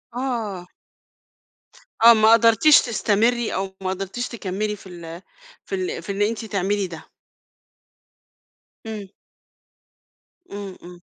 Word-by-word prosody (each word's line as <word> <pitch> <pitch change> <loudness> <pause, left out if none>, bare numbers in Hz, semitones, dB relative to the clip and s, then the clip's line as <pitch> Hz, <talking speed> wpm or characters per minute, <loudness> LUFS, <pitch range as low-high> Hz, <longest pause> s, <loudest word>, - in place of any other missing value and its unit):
آه. 225 -8 -3 1.4
آه 235 - +11
ما 220 0 +5
قدرتيش 230 +6 +6
تستمري، 235 +1 +1
أو 190 0 -3
ما 190 - -2
قدرتيش 195 +6 -4
تكمّلي 210 -1 -3
في 195 - -15
ال 170 -1 -9 0.4
في 390 - -4
ال 380 +5 -3
في - - -5
إن 200 +1 -3
أنتِ 220 +1 0
تعملي 200 -1 -1
ده؟ 165 -2 -11 1.8
امم. 215 -3 -7 1.4
امم، 200 -2 -7
امم. 175 0 -12
205 Hz, 115 wpm, -22 LUFS, 190-230 Hz, 1.8 s, آه